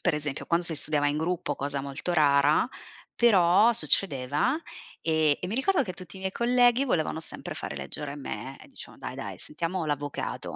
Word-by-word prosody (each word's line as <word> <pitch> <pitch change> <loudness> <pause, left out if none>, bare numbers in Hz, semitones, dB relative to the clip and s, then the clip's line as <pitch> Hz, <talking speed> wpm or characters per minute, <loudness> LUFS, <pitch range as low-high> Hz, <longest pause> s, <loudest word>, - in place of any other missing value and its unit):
per 175 - +2
esempio 150 -2 -3
quando 170 +1 +1
si 160 - 0
studiava 145 0 +1
in 150 +1 -1
gruppo, 165 -2 -2
cosa 140 0 -3
molto 140 +6 -4
rara, 145 - +4 0.5
però 205 0 +5
succedeva 185 - +2 0.4
e 160 -2 +2
e 180 - -4
mi 215 - -3
ricordo 290 +4 +2
che 185 - -5
tutti 185 +2 -11
i - - -10
miei 190 0 -3
colleghi 245 +2 +3
volevano 160 - -1
sempre 165 - -6
fare - - -6
leggere 145 -1 -4
me 135 -1 -7
e - - -15
dicevano: - - -11
"Dai, - - -5
dai - - -7
sentiamo 165 +2 -3
l'avvocato". 145 -1 -4
165 Hz, 180 wpm, -27 LUFS, 145-195 Hz, 0.5 s, però